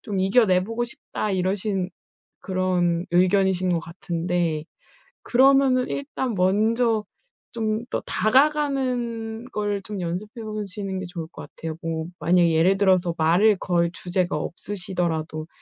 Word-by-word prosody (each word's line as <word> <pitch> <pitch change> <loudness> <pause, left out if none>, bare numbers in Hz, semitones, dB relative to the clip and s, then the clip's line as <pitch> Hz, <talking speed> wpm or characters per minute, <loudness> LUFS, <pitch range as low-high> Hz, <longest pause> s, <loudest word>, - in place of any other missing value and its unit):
좀 200 -4 -2
이겨내보고 205 +2 +2
싶다.' 215 -2 -5
이러신 190 0 -1 0.5
그런 180 -2 0
의견이신 185 +1 +3
거 170 - +1
같은데 170 -2 -2 0.6
그러면은 265 0 +4
일단 265 -4 -3
먼저 215 +4 +2 0.5
좀 220 -1 -1
더 - - -2
다가가는 250 -4 +1
걸 205 -1 -1
좀 205 -2 -5
연습해 210 +7 -5
보시는 205 -2 -4
게 190 - -5
좋을 175 -2 -6
거 - - -10
같아요. 160 -1 -7
뭐 160 -1 -3
만약에 170 +2 +3
예를 175 +5 +4
들어서 185 -4 +3
말을 185 +6 +4
걸 170 -2 +1
주제가 180 0 -1
없으시더라도 170 -4 -3
190 Hz, 275 characters per minute, -24 LUFS, 175-220 Hz, 0.6 s, 그러면은